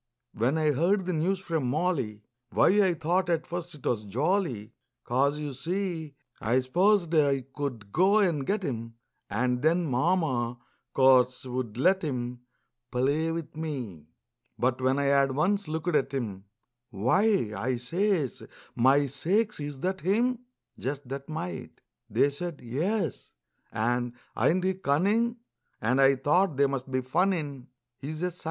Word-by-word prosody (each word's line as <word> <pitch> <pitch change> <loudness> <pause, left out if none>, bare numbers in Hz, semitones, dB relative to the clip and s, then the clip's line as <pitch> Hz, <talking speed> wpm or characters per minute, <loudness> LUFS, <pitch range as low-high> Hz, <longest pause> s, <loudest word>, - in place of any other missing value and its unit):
When 125 +8 +1
I 155 -1 +3
heard 180 +7 +1
the 180 - -1
news 175 +5 +1
from 165 -7 -2
Molly, 135 - -1 0.3
Why, - - +4
I 185 -3 +2
thought 175 +3 0
at 165 -2 +1
first 175 -3 -6
't - - -3
was 110 -3 0
jolly, 120 - -1 0.3
'Cause, 140 +4 +1
you 150 -2 -4
see, 165 +1 -3 0.2
I 120 +4 +2
s'posed 175 +6 +2
I 140 -4 +3
could 120 -8 -5
go 190 - +4
and 170 -9 +2
get 200 +7 -1
him 115 -6 -4 0.3
And 125 +4 0
then 170 +3 +2
Mama, 130 -4 +1 0.4
course, 130 -1 +4
would 125 -3 -4
let 185 +8 +3
him 125 -5 -3 0.5
Play 140 +6 +1
with 165 -2 -5
me. 125 - -5 0.5
But 130 +1 0
when 130 +1 +2
I 140 - +1
had 140 -1 +3
once 195 +8 +1
looked 160 +2 -2
at 135 -1 +1
him, 105 -7 -4 0.4
"Why!" 130 - +2
I 120 +6 -1
says, 165 - -1 0.3
"My 135 +4 +4
sakes, 190 - 0
is 145 -2 -6
that 190 +1 -1
him? 235 +7 +1 0.4
Just 135 0 -4
that 135 +1 -6
mite!" 160 - -6 0.3
They 145 - +3
said, 170 +2 -5
"Yes," 160 - -2 0.4
and, 120 +2 0 0.2
"Ain't 180 +2 +2
he 190 0 +2
cunnin'?" 195 +8 +1 0.4
And 125 +5 +2
I 135 0 +6
thought 150 +4 +2
they 140 - +5
must 135 -1 -3
be 130 0 0
funnin', 145 -2 -1 0.3
He's 155 +4 -5
a 180 - +1
_sight! 180 - -15
145 Hz, 150 wpm, -28 LUFS, 125-175 Hz, 0.5 s, I